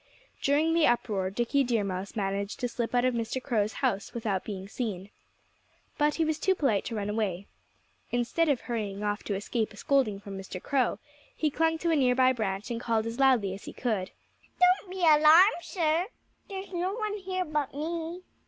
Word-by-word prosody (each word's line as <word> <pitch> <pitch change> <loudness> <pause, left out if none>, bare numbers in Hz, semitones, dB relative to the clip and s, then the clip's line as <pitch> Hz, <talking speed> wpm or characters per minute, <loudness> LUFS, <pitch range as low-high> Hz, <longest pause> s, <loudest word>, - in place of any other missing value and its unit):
During 300 +4 +2
the 330 -2 +4
uproar 205 -5 0
Dickie 240 +7 +1
Deer 235 -4 +1
Mouse 190 0 -4
managed 200 -1 -2
to 245 - 0
slip 240 0 -3
out 245 0 +3
of 255 - +2
Mr. 230 +2 -2
Crow's 220 -5 0
house 200 +4 -1
without 210 -5 -1
being 195 -2 -6
seen. 200 -4 -4 0.9
But 295 0 +3
he 325 - +1
was 315 -1 -1
too 380 - +2
polite 250 - +1
to 230 - -4
run 205 -1 -2
away. 205 -3 -2 0.6
Instead 245 +7 +1
of 275 -4 +1
hurrying 210 -4 -4
off 205 0 -1
to 205 - -1
escape 215 +2 -2
a - - -14
scolding 240 -6 +1
from 200 -1 -8
Mr. 190 -1 -7
Crow 260 +3 0 0.4
he 305 -2 0
clung 325 +2 +1
to 335 +1 0
a - - +3
near 255 -4 +3
by 260 0 +4
branch 205 -2 -3
and 235 0 -3
called 225 -2 0
as 230 +2 -5
loudly 250 -8 +4
as 195 - -9
he - - -8
could: 215 -7 -2 0.5
"Don't 365 +1 +4
be 375 0 -6
alarmed, 325 +4 +7
sir! 335 0 0 0.4
There's 385 -1 -7
no 360 +3 -1
one 425 -2 -2
here 370 -1 -3
but 300 -3 -1
me. 330 +4 -4
245 Hz, 195 wpm, -28 LUFS, 205-315 Hz, 0.9 s, alarmed